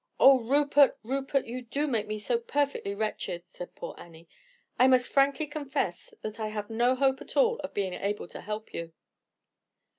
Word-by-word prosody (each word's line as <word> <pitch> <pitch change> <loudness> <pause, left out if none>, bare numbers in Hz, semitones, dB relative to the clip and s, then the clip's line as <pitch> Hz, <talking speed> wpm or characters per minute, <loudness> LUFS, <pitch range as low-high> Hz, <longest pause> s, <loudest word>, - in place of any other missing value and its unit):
"Oh, 270 -1 +8
Rupert! 280 +3 +4
Rupert! 270 +3 -1
you 250 +2 -5
do 275 +5 -2
make 225 -7 -1
me 215 0 -3
so 230 +3 0
perfectly 275 -5 -1
wretched," 200 -4 -3
said 180 0 -10
poor - - -6
Annie. 165 0 -14 0.5
"I 255 - +7
must 255 -1 +4
frankly 280 +2 +3
confess 280 - -3
that 215 +1 -6
I 215 - -1
have 215 0 -5
no 240 +3 +3
hope 265 0 +2
at - - -8
all 475 -1 +4
of - - -7
being 195 -3 -1
able 200 -1 -3
to - - -8
help 215 +1 -6
you." 165 -1 -6
240 Hz, 180 wpm, -29 LUFS, 210-275 Hz, 0.5 s, Oh